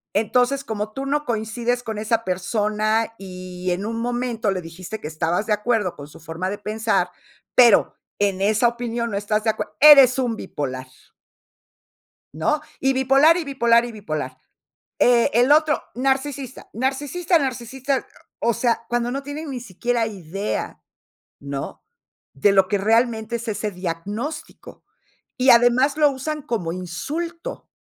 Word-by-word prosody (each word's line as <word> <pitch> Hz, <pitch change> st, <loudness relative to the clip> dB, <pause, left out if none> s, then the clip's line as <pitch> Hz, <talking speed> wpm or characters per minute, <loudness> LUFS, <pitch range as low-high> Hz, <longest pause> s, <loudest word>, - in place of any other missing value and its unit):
Entonces, 245 Hz, +6 st, +2 dB
como 215 Hz, -4 st, -4 dB
tú 270 Hz, +5 st, -5 dB
no 290 Hz, +2 st, 0 dB
coincides 235 Hz, +1 st, -2 dB
con 220 Hz, -2 st, -5 dB
esa 225 Hz, +1 st, 0 dB
persona 215 Hz, +4 st, 0 dB
y 185 Hz, -1 st, -6 dB
en 180 Hz, +3 st, -2 dB
un 225 Hz, +1 st, -3 dB
momento 240 Hz, -2 st, -1 dB
le 185 Hz, -1 st, -2 dB
dijiste 180 Hz, +5 st, -8 dB
que -, -, -6 dB
estabas 165 Hz, +5 st, -1 dB
de 215 Hz, -, +1 dB
acuerdo 210 Hz, -3 st, 0 dB
con 145 Hz, -, -10 dB
su 150 Hz, -, -15 dB
forma 165 Hz, +3 st, -4 dB
de 205 Hz, -, -4 dB
pensar, 215 Hz, +2 st, 0 dB, 0.4 s
pero, 240 Hz, -4 st, +5 dB, 0.3 s
en 195 Hz, -2 st, +1 dB
esa 215 Hz, +4 st, +3 dB
opinión 235 Hz, -1 st, -3 dB
no 200 Hz, -, -1 dB
estás 210 Hz, +1 st, -1 dB
de 220 Hz, -, +4 dB
acuerd -, -, -5 dB
eres 275 Hz, -3 st, +8 dB
un 245 Hz, -3 st, 0 dB
bipolar. 130 Hz, -9 st, -5 dB, 1.5 s
¿No? 225 Hz, -, 0 dB, 0.2 s
Y 270 Hz, 0 st, +2 dB
bipolar, 270 Hz, +6 st, +5 dB
y 345 Hz, -, -2 dB
bipolar, 235 Hz, -5 st, +3 dB
y 240 Hz, -, -6 dB
bipolar. 155 Hz, -, -5 dB, 0.6 s
Eh, 245 Hz, +2 st, +4 dB
el 245 Hz, +4 st, +5 dB
otro, 305 Hz, 0 st, +3 dB
narcisista, 270 Hz, 0 st, -2 dB
narcisista, 290 Hz, +8 st, 0 dB
narcisista. 260 Hz, 0 st, -2 dB, 0.3 s
O 235 Hz, -, +1 dB
sea, 235 Hz, -1 st, 0 dB
cuando 240 Hz, 0 st, 0 dB
no 275 Hz, +2 st, -3 dB
tienen 290 Hz, +2 st, -6 dB
ni 255 Hz, -2 st, -5 dB
siquiera 235 Hz, +2 st, -1 dB
idea, 195 Hz, -1 st, -5 dB, 0.6 s
¿no?, 140 Hz, -1 st, -6 dB, 0.5 s
de 170 Hz, +9 st, +3 dB
lo 195 Hz, -1 st, +4 dB
que 205 Hz, -, +1 dB
realmente 225 Hz, +2 st, +1 dB
es 235 Hz, 0 st, -7 dB
ese 210 Hz, 0 st, -2 dB
diagnóstico. 205 Hz, -, -6 dB, 0.5 s
Y 255 Hz, 0 st, +4 dB
además 245 Hz, +4 st, +5 dB
lo 300 Hz, -2 st, +4 dB
usan 295 Hz, +3 st, -4 dB
como 220 Hz, -, -3 dB
insulto, 300 Hz, -, -5 dB
230 Hz, 150 wpm, -22 LUFS, 200-265 Hz, 1.5 s, eres